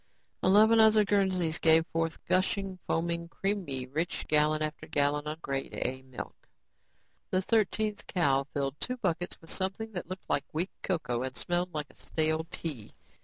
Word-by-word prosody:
Eleven 215 +4 +6
other 220 -1 +6
Guernseys 185 -5 +1
gave 160 0 +5
forth 165 0 -1
gushing, 190 0 0
foaming, 170 0 0
creamy 175 -11 -2
rich 155 +7 -2
gallon 155 0 +3
after 155 0 -4
gallon 145 +1 +1
of 155 +1 -4
Grade 135 0 -3
A 130 +1 -2
milk. 130 -1 -9 0.8
The 185 - +2
thirteenth 215 0 +1
cow 140 -6 +2
filled 140 0 -2
two 250 +1 -2
buckets 180 -5 -2
with 165 - -8
something 195 +4 -2
that 180 -5 -5
looked 185 0 -7
like 145 -1 +1
weak 170 +5 -2
cocoa 140 -10 -1
and 130 -1 -4
smelled 175 +1 -1
like 150 -1 -4
stale 155 0 -1
tea. 140 -11 -5
165 Hz, 155 wpm, -30 LUFS, 150-190 Hz, 0.8 s, Eleven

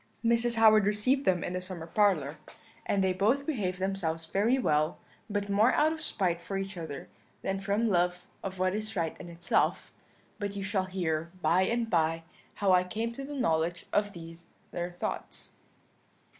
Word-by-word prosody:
"Mrs. 235 +1 +3
Howard 215 -2 +6
received 250 +7 +2
them 180 -2 +2
in 175 - -3
the 180 - -2
summer 180 -3 -7
parlour, 165 -6 +1 0.5
and 195 -1 +2
they 190 -1 +2
both 225 +9 +2
behaved 200 - -1
themselves 180 -4 -2
very 210 +9 +2
well, 155 - +1 0.3
but 205 -1 -1
more 210 +5 +4
out 310 +1 +3
of 320 - -7
spite 180 - 0
for 195 +3 -4
each 195 +1 -4
other 160 -5 -6 0.4
than 195 0 -1
from 200 +4 +1
love 180 -2 +1 0.2
of 190 -1 -5
what 185 0 +1
is 215 +1 -3
right 165 -3 -1
in 175 - -8
itself; 170 0 0 0.5
but 200 0 -3
you 200 - -3
shall 190 -1 0
hear 170 -3 -2
by 170 +4 +4
and 230 +1 -1
by 165 -1 +2 0.3
how 200 -2 +2
I 180 0 +5
came 225 +5 -3
to 275 - -6
the 290 +1 -6
knowledge 170 - 0
of 205 -1 +1
these 165 0 -10 0.3
their 175 0 -3
thoughts. 175 - -5
190 Hz, 180 wpm, -30 LUFS, 170-215 Hz, 0.5 s, Howard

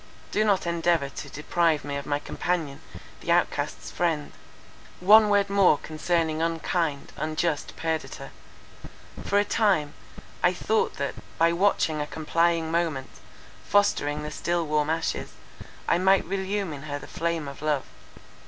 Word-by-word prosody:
Do 215 - +2
not 200 -4 +2
endeavour 170 -4 +1
to 145 - -8
deprive 155 +1 0
me 145 -1 -3
of 140 - -5
my 145 - +1
companion, 160 -2 -3 0.4
the - - -2
out - - +4
cast's - - -4
friend. 165 -4 -1 0.7
"One 210 +3 +7
word 200 -1 +3
more 195 -6 +4
concerning 160 0 -1
unkind, 165 -2 -1
unjust 155 0 -2
Perdita. 160 -1 -3 0.9
For 200 - +1
a 205 - +3
time, 190 -10 +2 0.5
I 175 - +4
thought 220 +4 0
that, 140 0 -2 0.2
by 165 +1 +4
watching 170 -4 +2
a 145 - -3
complying 165 +1 0
moment, 165 -6 -1 0.5
fostering 150 -7 +1
the 150 - -5
still 170 +1 -1
warm 150 0 +1
ashes, 165 0 -2 0.5
I 170 - +3
might 190 +1 +4
relume 195 -1 -2
in 140 - -8
her 145 - -2
the 145 - -10
flame 165 -2 -2
of 140 0 -9
love. 150 -3 0
165 Hz, 145 wpm, -26 LUFS, 150-180 Hz, 0.9 s, One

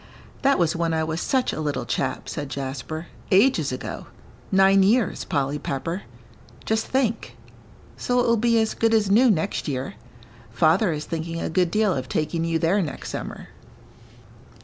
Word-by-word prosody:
"That 275 0 +3
was 170 -1 +1
when 165 -1 0
I 160 - +1
was 160 +1 -2
such 260 -2 0
a 155 - -4
little 150 -2 -2
chap," - - -2
said 145 -1 -5
Jasper, 140 +5 -5 0.2
"ages 190 - +4
ago, 130 - -6 0.4
nine 195 0 +5
years, 215 +2 +2
Polly 140 0 -1
Pepper, 165 +9 -3 0.6
just 220 0 0
think; 245 -4 -1 0.6
so 245 0 0
it 245 - +2
will 230 - +4
be 230 +1 +3
as 220 0 +1
good 225 0 +2
as 205 -3 +2
new 240 +5 +6
next 200 -2 0
year. 130 -5 -3 0.6
Father 160 - +3
is 150 -1 -4
thinking 165 0 -4
a - - -3
good 180 +1 +2
deal 210 +1 +2
of 130 -4 -4
taking 165 +2 -1
you 165 0 0
there 170 +5 +2
next 155 -6 -5
summer." - - -6
170 Hz, 170 wpm, -24 LUFS, 155-220 Hz, 0.6 s, new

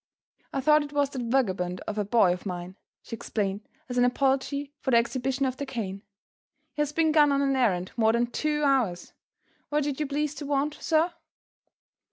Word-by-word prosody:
"I 275 - -2
thought 300 +3 +5
it 290 0 -7
was 285 -1 +1
that 260 - -4
vagabond 190 -8 0
of 215 0 -3
a - - +1
boy 200 -3 +4
of 180 - -7
mine," 180 -1 -5 0.3
she - - -6
explained, 205 -3 -2 0.3
as 250 -1 -1
an - - +5
apology 275 +3 0
for - - -3
the 240 - +5
exhibition 260 +3 0
of 255 -1 -2
the 285 - -3
cane. 205 -7 -4 0.7
"He 295 - -2
has 295 -1 0
been 320 0 +2
gone 300 -2 +5
on 280 0 +2
an 275 -1 +1
errand 185 -8 +1
more 220 -1 +3
than 235 +1 +2
two 300 +5 -1
hours. 245 -11 +1 0.6
What 300 0 +1
did 285 -1 -3
you 300 - -1
please 295 +1 -1
to 295 - -5
want, 290 +1 0
sir?" 325 +3 +1
265 Hz, 200 wpm, -27 LUFS, 220-290 Hz, 0.7 s, thought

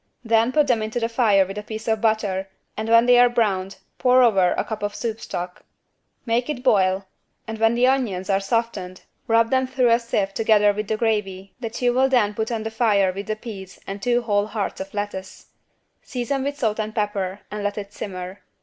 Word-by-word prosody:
Then 230 +1 +3
put 300 +2 +3
them 240 -5 +1
into 220 +2 -2
the 230 - 0
fire 220 -5 +3
with 195 +2 -6
a - - -5
piece 220 +1 -8
of 220 -1 +1
butter 205 -4 0 0.3
and 220 +1 -4
when 230 +1 +6
they 245 0 +6
are 245 0 +6
browned, 195 -5 0 0.2
pour 255 0 +5
over 195 -6 +4
a - - -1
cup 220 -2 -6
of 205 0 -3
soup 225 -2 -4
stock. 180 0 -6 0.6
Make 240 +3 0
it 260 -4 -4
boil 195 -5 +3 0.4
and 220 0 -5
when 225 +1 +3
the 245 +1 +3
onions 235 -9 0
are 195 -1 +2
softened 195 -3 -2 0.2
rub 230 0 +3
them 260 0 +2
through 255 -2 +2
a 230 - +5
sieve 205 -5 -1
together 210 -1 +3
with 210 0 -4
the 215 - -1
gravy 205 -4 -2
that 235 0 -5
you 245 0 +3
will 265 +2 +3
then 225 -6 +2
put 220 +2 -3
on 225 -2 -2
the 225 - -4
fire 210 -4 +2
with 200 +2 -6
the 215 - -1
peas 200 -5 -9
and 195 +1 -6
two 240 +2 +1
whole 205 -2 +1
hearts 210 -3 -4
of 195 +1 -7
lettuce. 205 -2 -6 0.5
Season 265 +2 -3
with 285 +1 -3
salt 220 -4 -1
and 215 0 -3
pepper 200 -2 -2
and 210 0 -4
let 205 0 -2
it 205 -1 -7
simmer. 185 0 -7
220 Hz, 215 wpm, -23 LUFS, 200-235 Hz, 0.6 s, when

